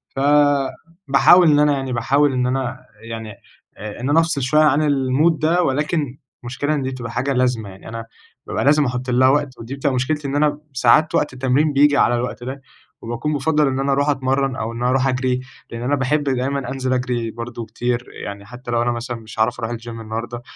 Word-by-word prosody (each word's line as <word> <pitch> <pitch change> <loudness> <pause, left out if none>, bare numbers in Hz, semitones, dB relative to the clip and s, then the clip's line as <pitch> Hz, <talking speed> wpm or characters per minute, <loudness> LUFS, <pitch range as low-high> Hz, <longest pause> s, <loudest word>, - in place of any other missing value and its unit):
فباحاول 145 +4 +3
إن 145 - +4
أنا 150 -1 +4
يعني 135 -2 -3
باحاول 140 +4 +2
إن 125 -1 0
أنا 130 -1 -2 0.3
يعني 110 -1 -6 0.5
آآ 105 +1 -7
إن 130 - -2
أنا 155 +3 +5
أفصل 165 -4 0
شوية 150 +4 +3
عن 150 0 +4
الmood 140 +4 +2
ده 165 +4 +2
ولكن 145 -1 -1 0.3
المشكلة 145 +5 -2
إن 145 - -1
دي 130 - -2
بتبقى 120 -3 -6
حاجة 130 +4 -1
لازمة، 125 -5 0
يعني 95 +2 -12
أنا 115 0 -6 0.4
بابقى - - -2
لازم 145 +1 +4
أحُط 125 0 -3
لها 125 +1 +4
وقت 145 -2 0
ودي 115 +4 -6
بتبقى 140 -1 -1
مشكلتي 145 +3 -1
إن 135 - -3
أنا 145 0 +1
ساعات 130 +5 +3
وقت 145 - +1
التمرين 135 +4 +1
بييجي 145 +1 +4
على 120 - +3
الوقت 120 -1 -4
ده 135 +2 -6 0.4
وباكون 120 +6 -3
بافضَّل 150 +1 +2
إن 130 0 -1
أنا 135 0 0
أروح 140 +2 +1
أتمرّن 135 -1 0
أو 110 -1 -3
إن 120 - -5
أروح 130 +2 +2
أجري، 125 -1 0 0.3
لإن 115 0 -6
أنا 135 +4 +1
باحب 145 +2 0
دايمًا 135 -1 -1
أنزل 130 -1 -1
أجري 120 -3 -2
برضه 115 0 -7
كتير، 120 +2 -2 0.2
يعني 100 0 -7
حتّى 120 +3 -9
لو 120 0 +1
أنا 120 - +1
مثلًا 120 0 -4
مش 110 -1 -11
هاعرف 120 +3 +1
أروح 115 0 -3
الgym 115 +1 -15
النهاردة، 115 +1 -6
130 Hz, 205 wpm, -20 LUFS, 120-145 Hz, 0.5 s, أنا